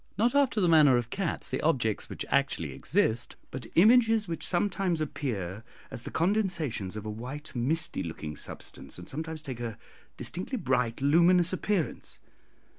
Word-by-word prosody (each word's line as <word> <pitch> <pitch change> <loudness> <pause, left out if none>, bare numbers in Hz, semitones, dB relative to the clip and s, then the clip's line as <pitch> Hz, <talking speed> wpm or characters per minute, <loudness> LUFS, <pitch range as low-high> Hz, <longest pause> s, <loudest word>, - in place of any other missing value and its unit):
Not 235 +4 +3
after 280 -6 +3
the 180 - +3
manner 150 -6 +6
of 120 -1 -3
cats 190 -4 -2
the - - -2
objects 120 -9 0
which - - -5
actually - - +1
exist 115 +2 +1 0.2
but 125 -3 -6
images 225 +2 +5
which 165 -1 -4
sometimes 185 -2 +1
appear 110 - -3 0.3
as - - -5
the - - -7
condensations 165 - 0
of 105 - -6
a - - -3
white 130 +7 -7
misty 155 +8 0
looking 80 -2 -5
substance, - - -6
and 90 0 -10
sometimes 160 +3 -5
take 130 -5 -6
a 115 -4 -4 0.4
distinctly 190 +9 -4
bright 125 - 0
luminous 170 +5 +4
appearance. 185 -2 -2
155 Hz, 155 wpm, -29 LUFS, 120-180 Hz, 0.4 s, manner